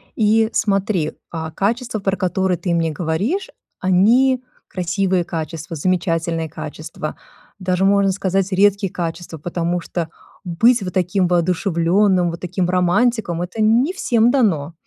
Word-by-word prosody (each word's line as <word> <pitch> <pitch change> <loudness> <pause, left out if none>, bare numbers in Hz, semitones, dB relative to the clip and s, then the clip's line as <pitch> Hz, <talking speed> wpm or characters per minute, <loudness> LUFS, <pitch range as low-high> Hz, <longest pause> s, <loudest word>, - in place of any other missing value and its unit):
И 220 0 +3
смотри, 195 -5 0 0.2
а, 160 -1 -5
качества, 225 +6 -1
про 195 0 0
которые 185 -1 0
ты 175 0 -2
мне 165 -1 +1
говоришь, 180 - -2 0.3
они 240 +8 +3 0.2
красивые 185 0 0
качества, 165 -1 -5
замечательные 165 -1 -1
качества, 160 - -7 0.4
даже 185 0 0
можно 200 -1 +3
сказать, 195 0 -1
редкие 200 0 +2
качества, 165 -1 -5
потому 170 +2 -2
что 165 -1 -4 0.3
быть 225 +7 +3
вот 180 - -5
таким 185 0 +1
воодушевленным, 180 +1 +2
вот 170 - -7
таким 180 0 -2
романтиком- 185 0 +1
это 180 +5 -4
не 240 +11 +3
всем 235 - +2
дано, 170 - +1
185 Hz, 130 wpm, -20 LUFS, 170-205 Hz, 0.4 s, И